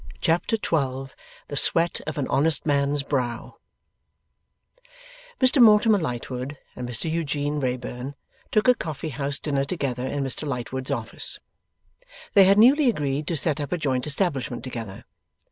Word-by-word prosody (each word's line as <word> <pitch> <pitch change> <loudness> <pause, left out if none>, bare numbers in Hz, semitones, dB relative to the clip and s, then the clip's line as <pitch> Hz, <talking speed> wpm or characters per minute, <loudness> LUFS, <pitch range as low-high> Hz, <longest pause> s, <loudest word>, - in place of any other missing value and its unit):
Chapter 170 +7 +1
12 135 -8 -2 0.4
THE 145 - -4
SWEAT 165 +4 +4
OF 155 - -4
AN 140 - -1
HONEST 150 +1 +2
MAN'S 140 -1 +1
BROW 125 -4 -3 1.8
Mr 260 +1 +5
Mortimer 215 -1 +6
Lightwood 130 -1 -4 0.2
and 125 -1 -6
Mr 125 +6 -3
Eugene 150 -2 -1
Wrayburn 125 +1 -4 0.3
took 215 +2 +1
a 250 - +7
coffee 155 - -5
house 140 0 -2
dinner 140 -2 -1
together 135 -5 -3
in 140 0 -2
Mr 135 +3 -4
Lightwood's 130 0 -4
office. - - -2 1.0
They 195 -2 +7
had 195 +2 +5
newly 265 +5 +6
agreed 145 - -2
to 170 - -1
set 150 +1 0
up 145 - -5
a 180 - 0
joint 135 -4 -1
establishment 140 -6 -1
together. 115 -6 -7
145 Hz, 145 wpm, -24 LUFS, 130-165 Hz, 1.8 s, a